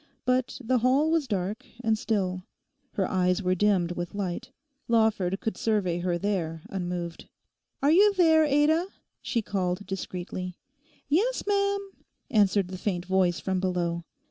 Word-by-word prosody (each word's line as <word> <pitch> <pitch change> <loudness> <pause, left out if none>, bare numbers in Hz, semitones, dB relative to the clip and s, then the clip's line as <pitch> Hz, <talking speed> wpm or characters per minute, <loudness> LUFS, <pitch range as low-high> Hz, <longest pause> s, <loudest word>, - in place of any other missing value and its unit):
But 255 0 +1
the 250 +2 +2
hall 270 +6 +3
was 325 -4 +1
dark 200 0 -2 0.2
and 220 -1 +3
still; 190 -4 -1 0.5
her 195 - 0
eyes 180 +1 +1
were 185 0 +2
dimmed 185 -2 +2
with 175 +1 -5
light. 195 +3 -3 0.4
Lawford 220 -5 +2
could 220 - -2
survey 195 -6 0
her 175 0 0
there 170 -5 -2
unmoved. 175 -3 -4 0.5
'Are 285 - +5
you 405 +5 +6
there, 320 -3 +5
Ada?' 305 +4 +3 0.3
she 230 -3 -1
called 190 -1 -2
discreetly. 185 -1 -5 0.5
'Yes, 410 - +1
ma'am,' 400 -1 0 0.4
answered 200 -3 +3
the 185 -1 -6
faint 180 -4 -2
voice 185 -2 +2
from 190 -1 -1
below. 175 -2 -1
200 Hz, 145 wpm, -27 LUFS, 180-255 Hz, 0.5 s, you